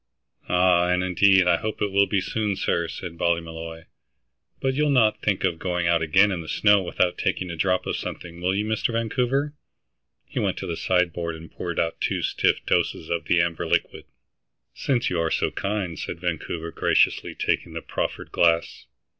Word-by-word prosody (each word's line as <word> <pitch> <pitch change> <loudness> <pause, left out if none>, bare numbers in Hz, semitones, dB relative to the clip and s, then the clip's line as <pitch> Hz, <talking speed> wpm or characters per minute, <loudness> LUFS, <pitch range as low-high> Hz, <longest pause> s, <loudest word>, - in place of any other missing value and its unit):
"Ah, 90 -1 +4
and 90 0 +2
indeed, 95 0 +4
I 85 -1 +4
hope 110 +2 -4
it 105 -1 -1
will 100 0 +4
be 100 -2 +1
soon, 105 0 -1
sir," 85 -2 0
said 85 0 -7
Ballymolloy. 80 -1 -2 0.8
"But 135 0 0
you'll 150 +2 +1
not 110 -6 +3
think 100 -3 0
of 80 - 0
going 90 -1 -1
out 85 -1 +3
again 95 +6 +4
in 90 -3 -3
the 80 - -9
snow 105 -1 +4
without 90 0 0
taking 90 -2 -1
a - - -5
drop 90 +3 +1
of - - -2
something, 85 0 -7
will 90 +2 +1
you, 105 +2 0
Mr. 110 +2 -1
Vancouver?" 125 +5 0 0.7
He - - -4
went - - 0
to - - -5
the 85 - -3
sideboard 85 -2 0
and 80 +1 -11
poured 85 -1 -4
out 80 0 -1
two - - -1
stiff - - +1
doses 80 - 0
of 85 - -1
the 85 - +3
amber 85 -1 -2
liquid. - - -1 0.7
"Since 125 -7 0
you 90 - 0
are 80 -1 +1
so - - 0
kind," 100 -4 -3
said - - -5
Vancouver, 85 -1 -3
graciously - - +1
taking - - -1
the - - -6
proffered - - -4
glass. 85 -1 +1
90 Hz, 190 wpm, -24 LUFS, 85-105 Hz, 0.8 s, Ah